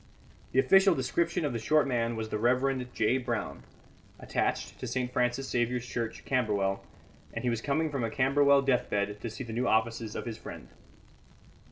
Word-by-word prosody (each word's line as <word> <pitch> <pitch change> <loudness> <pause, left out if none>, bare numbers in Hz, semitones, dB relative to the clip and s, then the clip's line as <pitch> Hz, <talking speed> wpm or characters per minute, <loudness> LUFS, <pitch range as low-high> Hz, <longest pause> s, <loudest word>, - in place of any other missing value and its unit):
The - - -3
official 195 +7 +5
description 170 +6 0
of 140 - -1
the 115 - -2
short 150 +6 +3
man 120 -2 0
was 110 -1 -4
the 105 - -2
Reverend 125 +2 +1
J. 120 +3 +1
Brown, 120 -2 -3 0.6
attached - - -2
to - - -5
St. 125 -1 -2
Francis 125 +2 0
Xavier's 120 0 0
Church, 115 -2 -4
Camberwell, 100 -6 0 0.5
and 115 - -3
he 125 - +1
was 115 -1 -2
coming 155 +4 0
from 135 -4 -2
a 115 - 0
Camberwell 140 +2 +4
deathbed 105 -6 0
to 115 - -4
see 115 - -6
the 115 -2 -7
new 125 +3 0
offices 110 0 0
of - - -4
his 115 -2 -5
friend. - - -9
125 Hz, 180 wpm, -29 LUFS, 115-135 Hz, 0.6 s, official